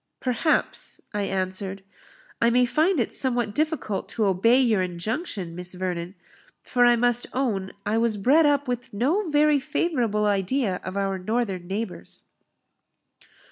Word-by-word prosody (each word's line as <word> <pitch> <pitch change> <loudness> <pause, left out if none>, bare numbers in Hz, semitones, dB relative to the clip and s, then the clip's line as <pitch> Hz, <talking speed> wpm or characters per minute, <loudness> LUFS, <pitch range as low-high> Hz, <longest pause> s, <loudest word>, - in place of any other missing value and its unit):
"Perhaps," 260 +5 0
I 205 - -1
answered, 190 0 -2 0.6
"I 235 - +5
may 250 +1 +4
find 315 +6 +2
it 235 - -1
somewhat 240 -5 -1
difficult 310 - -2
to 220 - 0
obey 205 +6 +4
your 225 -7 +3
injunction, 185 - -4
Miss 180 +1 -5
Vernon; 180 0 -4 0.5
for 245 -1 +2
I 240 0 +6
must 245 0 +2
own 210 -8 -1
I 220 +2 +1
was 230 -2 +1
bred 285 +10 +4
up 285 -1 +1
with 245 -4 -4
no 320 - +1
very 295 -1 +4
favourable 245 -8 0
idea 200 +1 0
of 185 +1 -5
our 195 -1 -1
northern 195 -3 -2
neighbours." 200 +1 -5
225 Hz, 140 wpm, -25 LUFS, 195-260 Hz, 0.6 s, I